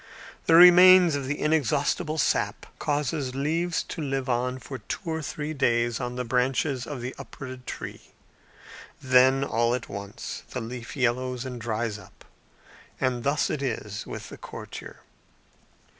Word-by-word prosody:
The 165 Hz, -, +6 dB
remains 180 Hz, 0 st, +9 dB
of 140 Hz, -2 st, -2 dB
the 145 Hz, +2 st, -2 dB
exhaustible 155 Hz, +2 st, +1 dB
sap 150 Hz, -, 0 dB
causes 145 Hz, -2 st, -1 dB
leaves 165 Hz, +5 st, 0 dB
to 165 Hz, -, -6 dB
live 135 Hz, -2 st, -2 dB
on 125 Hz, +1 st, 0 dB
for 130 Hz, 0 st, -8 dB
two 140 Hz, -, -6 dB
or 160 Hz, 0 st, -2 dB
three 150 Hz, +2 st, -4 dB
days 120 Hz, -4 st, +1 dB
on 125 Hz, 0 st, -4 dB
the 125 Hz, 0 st, -3 dB
branches 125 Hz, +2 st, 0 dB
of 145 Hz, -5 st, -5 dB
the 125 Hz, +2 st, -4 dB
uprooted 130 Hz, -2 st, -9 dB
tree; -, -, -6 dB, 1.0 s
then, 130 Hz, +1 st, +4 dB
all 120 Hz, -2 st, +1 dB
at 125 Hz, -, -6 dB
once, 100 Hz, +1 st, -6 dB
the 125 Hz, -, -4 dB
leaf 120 Hz, +3 st, -7 dB
yellows 125 Hz, 0 st, 0 dB
and 125 Hz, -2 st, -6 dB
dries 110 Hz, -1 st, -2 dB
up: -, -, -17 dB, 0.7 s
and 125 Hz, -2 st, 0 dB
thus 145 Hz, +1 st, +1 dB
it 150 Hz, -, -2 dB
is 105 Hz, -6 st, -4 dB
with -, -, -7 dB
the -, -, -11 dB
courtier. -, -, -9 dB
130 Hz, 150 wpm, -26 LUFS, 120-150 Hz, 1.0 s, remains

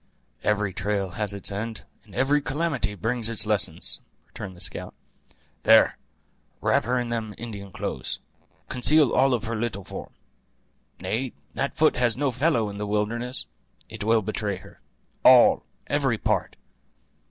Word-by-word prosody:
"Every 105 Hz, -2 st, +1 dB
trail 100 Hz, 0 st, -1 dB
has 105 Hz, +1 st, -1 dB
its 100 Hz, 0 st, -1 dB
end, 110 Hz, +2 st, -4 dB, 0.2 s
and -, -, -15 dB
every 145 Hz, +2 st, +3 dB
calamity 140 Hz, -8 st, -1 dB
brings 115 Hz, +4 st, -1 dB
its 115 Hz, -1 st, +1 dB
lesson!" 105 Hz, -6 st, +1 dB, 0.5 s
returned 95 Hz, -2 st, -8 dB
the -, -, -14 dB
scout. 90 Hz, -, -3 dB, 0.7 s
"There, -, -, +6 dB, 0.6 s
wrap -, -, +2 dB
her 125 Hz, +2 st, +1 dB
in 120 Hz, -1 st, -3 dB
them 110 Hz, -3 st, -3 dB
Indian 105 Hz, -4 st, -7 dB
cloths. -, -, -4 dB, 0.5 s
Conceal 145 Hz, +2 st, +4 dB
all 135 Hz, -1 st, +4 dB
of 110 Hz, -, -4 dB
her 115 Hz, +2 st, -3 dB
little 110 Hz, -3 st, -2 dB
form. -, -, -8 dB, 0.9 s
Nay, 125 Hz, +3 st, -2 dB, 0.2 s
that 140 Hz, +1 st, -2 dB
foot 155 Hz, -3 st, +3 dB
has 125 Hz, -2 st, +2 dB
no 140 Hz, -1 st, +1 dB
fellow 125 Hz, -3 st, +2 dB
in 100 Hz, 0 st, -6 dB
the 105 Hz, -, -3 dB
wilderness; 115 Hz, +5 st, -1 dB, 0.4 s
it -, -, -6 dB
will 110 Hz, 0 st, +3 dB
betray 105 Hz, 0 st, -2 dB
her. 90 Hz, -, -14 dB, 0.4 s
All, -, -, +7 dB, 0.2 s
every -, -, +1 dB
part. -, -, 0 dB
110 Hz, 150 wpm, -25 LUFS, 105-125 Hz, 0.9 s, All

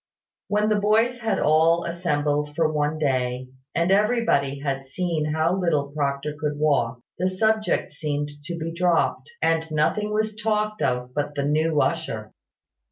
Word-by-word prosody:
When 210 Hz, +1 st, +1 dB
the 210 Hz, -1 st, +2 dB
boys 225 Hz, +4 st, +2 dB
had 225 Hz, -2 st, 0 dB
been -, -, 0 dB
all 160 Hz, +2 st, +4 dB
assembled 150 Hz, -4 st, -1 dB
for 160 Hz, -1 st, +1 dB
one 150 Hz, +1 st, 0 dB
day, 130 Hz, -3 st, -1 dB, 0.3 s
and 170 Hz, +2 st, +2 dB
everybody 205 Hz, -, +2 dB
had 140 Hz, -1 st, -3 dB
seen 155 Hz, +3 st, -2 dB
how 160 Hz, +3 st, +1 dB
little 155 Hz, -7 st, 0 dB
Proctor 140 Hz, 0 st, -2 dB
could 150 Hz, -1 st, -2 dB
walk, 130 Hz, -6 st, +1 dB, 0.2 s
the 185 Hz, -, +2 dB
subject 215 Hz, -1 st, +1 dB
seemed 145 Hz, -1 st, -3 dB
to 170 Hz, 0 st, -4 dB
be 165 Hz, 0 st, -4 dB
dropped, 175 Hz, -, +1 dB
and 165 Hz, 0 st, +1 dB
nothing 160 Hz, +7 st, 0 dB
was 215 Hz, 0 st, 0 dB
talked 215 Hz, -1 st, -1 dB
of 125 Hz, -1 st, -1 dB
but 145 Hz, +1 st, -2 dB
the 140 Hz, -, -1 dB
new 155 Hz, +1 st, +2 dB
usher. 115 Hz, -10 st, -2 dB
155 Hz, 160 wpm, -24 LUFS, 145-185 Hz, 0.3 s, all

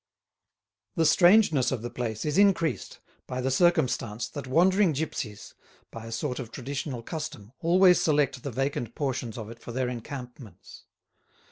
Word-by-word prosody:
The 165 Hz, -3 st, +2 dB
strangeness 175 Hz, -, +5 dB
of 125 Hz, -4 st, -3 dB
the 120 Hz, -, -5 dB
place 115 Hz, -3 st, -4 dB
is 150 Hz, +5 st, +1 dB
increased 170 Hz, -8 st, +1 dB, 0.3 s
by 125 Hz, -, -4 dB
the 130 Hz, +1 st, -1 dB
circumstance 125 Hz, -7 st, +1 dB
that 135 Hz, +2 st, -7 dB
wandering 185 Hz, +5 st, +3 dB
gipsies, 130 Hz, -8 st, -5 dB, 0.4 s
by 115 Hz, 0 st, -8 dB
a -, -, -8 dB
sort 125 Hz, +3 st, -3 dB
of 120 Hz, -4 st, -6 dB
traditional 135 Hz, -1 st, -5 dB
custom 150 Hz, -8 st, -6 dB
always 180 Hz, +2 st, +5 dB
select 145 Hz, -4 st, +1 dB
the 140 Hz, -, -4 dB
vacant 130 Hz, -2 st, -3 dB
portions 130 Hz, -5 st, -3 dB
of 110 Hz, -1 st, -7 dB
it 115 Hz, -, -12 dB
for 120 Hz, -, -9 dB
their 125 Hz, +1 st, -1 dB
encampments. 125 Hz, -, -9 dB
130 Hz, 150 wpm, -27 LUFS, 120-155 Hz, 0.4 s, strangeness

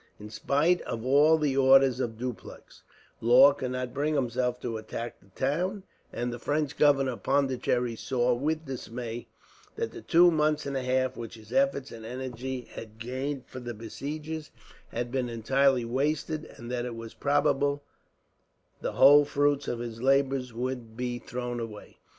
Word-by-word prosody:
In 105 Hz, +1 st, -10 dB
spite 150 Hz, +10 st, +2 dB
of 115 Hz, +1 st, -5 dB
all 145 Hz, +4 st, +5 dB
the 150 Hz, -4 st, 0 dB
orders 135 Hz, -1 st, +5 dB
of 115 Hz, -4 st, -2 dB
Dupleix, 125 Hz, 0 st, -8 dB, 0.4 s
Law 130 Hz, +5 st, +7 dB
could 130 Hz, -2 st, -4 dB
not 125 Hz, -1 st, -4 dB
bring 150 Hz, +2 st, 0 dB
himself 125 Hz, -2 st, 0 dB
to 115 Hz, -2 st, -3 dB
attack 115 Hz, +2 st, -6 dB
the 100 Hz, -, -24 dB
town; 180 Hz, +9 st, -1 dB, 0.3 s
and 120 Hz, 0 st, -3 dB
the 120 Hz, -, -6 dB
French 145 Hz, +2 st, -1 dB
governor 140 Hz, -3 st, +4 dB
of 120 Hz, -, -8 dB
Pondicherry 130 Hz, -3 st, +1 dB
saw, 125 Hz, +1 st, +1 dB
with 155 Hz, +6 st, -1 dB
dismay, 120 Hz, -3 st, -6 dB, 0.5 s
that 460 Hz, +1 st, -3 dB
the 360 Hz, -, -9 dB
two 175 Hz, -, +5 dB
months 155 Hz, -1 st, +1 dB
and 140 Hz, -1 st, -3 dB
a 135 Hz, -, 0 dB
half, 130 Hz, 0 st, 0 dB
which 115 Hz, -1 st, -7 dB
his 110 Hz, -1 st, -13 dB
efforts 270 Hz, -, +1 dB
and 115 Hz, -1 st, -9 dB
energy 125 Hz, +1 st, -5 dB
had 110 Hz, -1 st, -9 dB
gained 130 Hz, +4 st, -4 dB
for 130 Hz, -, -9 dB
the 120 Hz, -1 st, -6 dB
besiegers, 150 Hz, +8 st, -6 dB, 0.4 s
had 120 Hz, 0 st, -4 dB
been 130 Hz, -2 st, -1 dB
entirely 130 Hz, +2 st, +2 dB
wasted; 150 Hz, +5 st, -1 dB
and 120 Hz, 0 st, -8 dB
that 125 Hz, -1 st, -1 dB
it 120 Hz, -2 st, -5 dB
was 115 Hz, -1 st, -8 dB
probable 145 Hz, 0 st, +1 dB, 1.0 s
the -, -, -3 dB
whole 145 Hz, +2 st, +8 dB
fruits 145 Hz, 0 st, +1 dB
of 120 Hz, -, -2 dB
his 115 Hz, -1 st, -6 dB
labours 135 Hz, -1 st, +2 dB
would 120 Hz, -1 st, -5 dB
be 125 Hz, -1 st, -2 dB
thrown 120 Hz, 0 st, -4 dB
away. 110 Hz, -3 st, -8 dB
130 Hz, 170 wpm, -28 LUFS, 120-145 Hz, 1.0 s, whole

